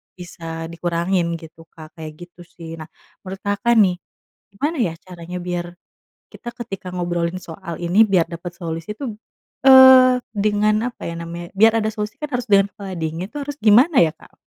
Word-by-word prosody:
bisa 165 -2 -8
dikurangin 170 +1 -1
gitu, 165 0 -14
Kak, 155 -2 -14
kayak 155 -1 -7 0.2
gitu 175 - -17
sih. 165 -1 -10
Nah, 155 - -8 0.3
menurut 190 0 -8
Kakak 205 +4 +1
nih, 185 -4 +4 0.6
gimana 295 +10 -2
ya 170 -6 0
caranya 180 -1 -9
biar 175 -1 -4 0.6
kita 240 - -8
ketika 195 -5 -8
ngobrolin 175 0 -2
soal 165 0 -8
ini 180 +6 +4
biar 180 -5 +2
dapat 175 +1 -7
solusi 165 +3 -5
tuh, 245 -7 -5 0.5
eee, 260 -1 +8
dengan 210 +2 +1
apa - - -13
ya 170 - -6
namanya 170 +1 -7
biar 225 +2 +5
ada 215 - 0
solusi 210 -1 -5
kan 300 - -4
harus 245 0 -3
dengan 200 0 +4
kepala 195 -2 -8
dingin 165 +3 -4
itu 295 - -9
harus 290 +1 -7
gimana 245 +8 +5
ya, 160 -2 0
Kak? - - -20
180 Hz, 175 wpm, -20 LUFS, 170-215 Hz, 0.6 s, eee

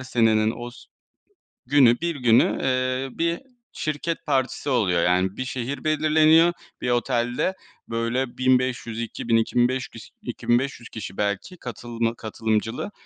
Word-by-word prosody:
senenin 115 -4 +2
os 120 +1 -9 0.8
günü, 130 -1 +5
bir 170 -2 -1
günü, 120 -3 +3
eee, 130 0 0
bir 170 +1 +1 0.3
şirket 155 +2 -3
partisi 135 0 0
oluyor. 95 -10 +2
Yani 90 +2 +1
bir 130 - -3
şehir 130 +1 -4
belirleniyor, 155 +2 +4 0.3
bir 125 - -1
otelde 120 +6 0 0.4
böyle, 115 +2 -2
1500, 130 -3 +1
2000, 115 0 0
2005 125 +2 +1
kiş 115 - -13
2500 120 0 -1
kişi 110 -3 -7
belki 100 - -2
katılma 120 - -3
katılımcılı 110 - -2
120 Hz, 120 wpm, -24 LUFS, 115-135 Hz, 0.8 s, günü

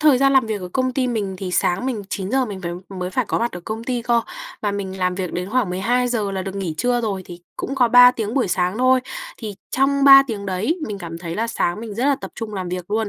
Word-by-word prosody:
thời 300 -4 +5
gian 275 +1 +4
làm 265 -4 +4
việc 215 -2 -3
ở 180 - -6
công 255 -1 0
ty 260 0 0
mình 210 -5 -2
thì 185 -1 -4
sáng 180 +6 +1
mình 235 -6 -2
9:00 210 +8 0
mình 205 -5 -6
vào 175 -1 -5
mới 185 -2 -5
phải 255 +6 0
có - - 0
mặt 235 +1 -1
ở 175 - -6
công 220 +5 -5
ty 245 -1 -2
cơ, 235 0 +2 0.4
và 205 - 0
mình 190 -1 -4
làm 180 0 0
việc 185 -2 -4
đến 180 +2 -4
khoảng 240 -6 +1
12:00 225 +1 0
là 190 -1 -2
được 195 +1 -6
nghỉ 185 -5 -3
trưa 245 +5 +1
rồi, 200 -5 -2
thì 175 0 -10 0.2
cũng 275 - -4
có 250 -3 +3
3 245 +1 +9
tiếng 225 -2 -4
buổi 255 -8 +1
sáng 180 +3 0
thôi. 255 0 +4 0.4
Thì 215 -3 -6 0.2
trong 275 +1 +2
3 275 0 +10
tiếng 205 -4 -5
đấy, 200 - -1
mình 205 -2 -5
cảm 165 -2 -7
thấy 170 -1 -5
là 225 +4 -1
sáng 210 -4 -1
mình 225 -2 -7
rất 240 +5 -1
là 285 -1 +3
tập - - -7
trung 220 -2 -6
làm 185 -2 -4
việc 180 +1 -5
luôn, 220 0 0
215 Hz, 275 wpm, -21 LUFS, 185-250 Hz, 0.4 s, 3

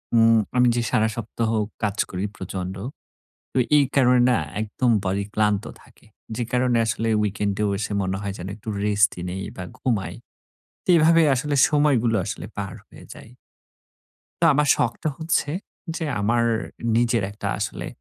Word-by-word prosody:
উম 115 0 +6 0.2
আমি 125 0 +5
যে 120 - +1
সারা 110 0 +3
সপ্তাহ 115 0 -3 0.3
কাজ 105 -1 -1
করি 90 +2 -3
প্রচন্ড। 95 0 -5 0.8
তো - - 0 0.2
এই 145 - +5
কারণে 125 -2 +5
না 120 - +3 0.2
একদম 115 +3 0
বডি 100 +2 -1
ক্লান্ত 105 0 +1 0.2
থাকে। - - -22 0.3
যে 120 - -1
কারণে 125 -1 +2
আসলে 115 0 -1
উইকেন্ডেও 105 0 -1
এসে 105 0 -3
মনে 95 0 -1
হয় 100 -1 -4
যেন 90 - -6
একটু 110 - -12 0.2
রেস্টই 100 -3 +2
নেই 95 +1 -4
বা 90 - -5
ঘুমাই। 95 -9 -1 0.7
তে - - -12
এভাবেই 165 0 +5
আসলে 145 +3 -1
সময়গুলো 135 -7 +2
আসলে - - -5
পার - - -4
হয়ে - - -14
যায়। 115 - -14 1.1
তো - - +2
আমার 150 +1 +2
শখটা 125 +5 -1
হচ্ছে 160 -2 0 0.5
যে, 165 - -3 0.2
আমার 115 +3 +2 0.5
নিজের 120 -3 +2
একটা 105 - -6
আসলে - - -4
115 Hz, 155 wpm, -23 LUFS, 100-125 Hz, 1.1 s, উম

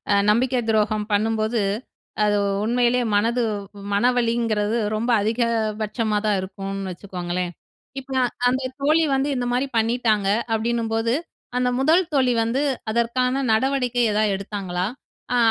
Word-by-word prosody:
அ - - +5 0.2
நம்பிக்கை 250 +3 +2
துரோகம் 215 -1 +1
பண்ணும்போது. 220 +1 +1 0.6
அது 205 0 +2 0.3
உண்மையிலயே 245 +1 +2
மனது 230 +4 +2 0.5
மனவலிங்கிறது 230 -2 +1 0.2
ரொம்ப 235 +3 -1
அதிக 220 +4 -1 0.4
பட்சமாதான் 215 -1 0
இருக்கும்னு 195 0 -5
வச்சுக்கோங்களேன். 180 -1 -4 0.5
இப்ப 270 0 -9
நா - - +3 0.3
அந்த 260 +1 0 0.2
தோழி 310 +3 +4
வந்து 270 +2 +1
இந்த 245 - -1
மாதிரி 255 +3 +1
பண்ணிட்டாங்க. 220 -3 +1 0.2
அப்படின்னும்போது 225 0 0 0.5
அந்த 250 0 +1
முதல் 320 +6 +4
தோழி 260 -3 +3
வந்து 245 +5 0 0.3
அதற்கான 250 +4 +1
நடவடிக்கை 250 +1 +1
எதாவது 215 +1 +2
எடுத்தாங்களா? 190 -2 -3 0.5
அ - - +3
225 Hz, 120 wpm, -23 LUFS, 210-250 Hz, 0.6 s, அ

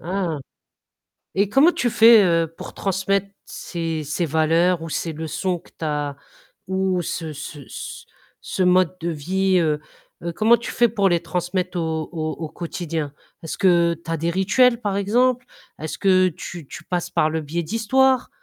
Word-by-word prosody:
Ah! 175 -3 -2 1.0
Et 200 +1 +2
comment 285 +9 +5
tu 245 - 0
fais, 225 -1 +7
heu, 165 -2 +2
pour - - -8
transmettre 195 +1 0 0.2
ces 165 -3 -4
ces 150 +4 -1
valeurs 165 +3 +2
ou 165 - -6
ces 165 +1 -3
leçons 165 +3 -2
que - - -21
tu 160 - -4
as 145 -2 -2 0.5
ou 190 -1 0
ce 160 -2 -4
ce 145 -2 -8
c - - -8 0.4
ce 185 - -2
mode 180 0 +3
de 170 - -1
vie, 185 +4 +1
heu, 155 -3 +1 0.6
comment 225 +2 +5
tu 235 - -6
fais 240 0 +4
pour 200 -3 +2
les 170 -1 +2
transmettre 180 +1 -2
au 160 -1 -2
au 155 -2 -3
au 160 -2 -6
quotidien? 165 -4 -4 0.3
Est-ce 160 - -5
que 170 -3 +4
tu - - -10
as 165 - 0
des 165 +2 -1
rituels 235 +7 +3
par 200 -2 -1
exemple? 245 +5 +2 0.3
Est-ce 155 0 -5
que 185 -2 +4
tu 170 -1 -8
tu 155 - -9
passes 180 -1 -2
par 155 - +2
le 160 0 -2
biais 160 +3 -3
d'histoires? 255 +7 +2
175 Hz, 175 wpm, -22 LUFS, 160-195 Hz, 1.0 s, fais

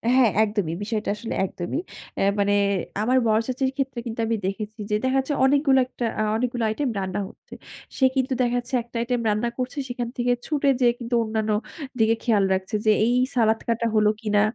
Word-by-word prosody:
হ্যাঁ, 255 -3 +5
একদমই। 205 -6 -1
বিষয়টা 215 0 -2
আসলে 225 +2 -5
একদমই। 180 - -4 0.4
অ্যা - - +1 0.2
মানে 200 0 +2 0.5
আমার 250 +4 +2
বড় 215 0 +4
চাচীর 260 +1 0
ক্ষেত্রে 265 -3 -2
কিন্তু 230 0 -5
আমি 230 - +1
দেখেছি 210 +2 -4
যে - - +3
দেখা 260 +1 +2
যাচ্ছে 265 +2 -1
অনেকগুলো 275 0 +4
একটা 245 -2 -4
আ - - +2
অনেকগুলো 240 0 -1
আইটেম 260 +5 -1
রান্না 190 +1 -3
হচ্ছে। - - -16 0.4
সে 265 - +4
কিন্তু 260 0 +1
দেখাচ্ছে 245 +2 -1
একটা 240 - -24
আইটেম 245 0 -1
রান্না 215 +3 0
করছে 255 +2 -4
সেখান 245 -1 -3
থেকে 245 0 +1
ছুটে 290 -2 +1
গিয়ে 245 -2 +5
কিন্তু 240 0 -2
অন্যান্য 220 -1 -1 0.5
দিকে 225 +1 +4
খেয়াল 215 -5 +3
রাখছে। 190 +2 -2
যে 215 - +6
এই 240 - +2 0.2
সালাদ 225 -2 +3
কাটা 230 0 0
হলো 210 -1 +4
কিনা, 210 -2 +2
235 Hz, 190 wpm, -24 LUFS, 215-255 Hz, 0.5 s, যে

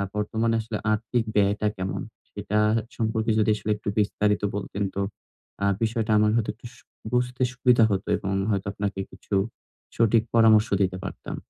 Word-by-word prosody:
বর্তমানে 110 +2 0
আসলে 110 -1 -4 0.2
আর্থিক 115 +2 -1
ব্যয়টা 105 +1 +2
কেমন? 95 +1 -3 0.3
সেটা 105 - -3 0.4
সম্পর্কে 110 -1 0
যদি 110 0 +2
আসলে 105 0 -3
একটু 105 0 -5
বিস্তারিত 105 0 +1
বলতেন 100 0 -3
তো 100 - 0 0.6
আ - - +3 0.2
বিষয়টা 110 0 0
আমার 105 0 +4
হয়তো 115 -2 0
একটু 120 - -18
উস 125 - -18 0.4
বুঝতে 125 +1 0
সুবিধা 125 -2 +4
হতো 95 -1 -1
এবং 95 0 -3 0.2
হয়তো 100 -2 -1
আপনাকে 100 -1 -3
কিছু 100 - -5 0.6
সঠিক 115 -1 +4
পরামর্শ 110 -1 +6
দিতে 95 -1 +1
পারতাম। - - -6
110 Hz, 155 wpm, -25 LUFS, 100-115 Hz, 0.6 s, পরামর্শ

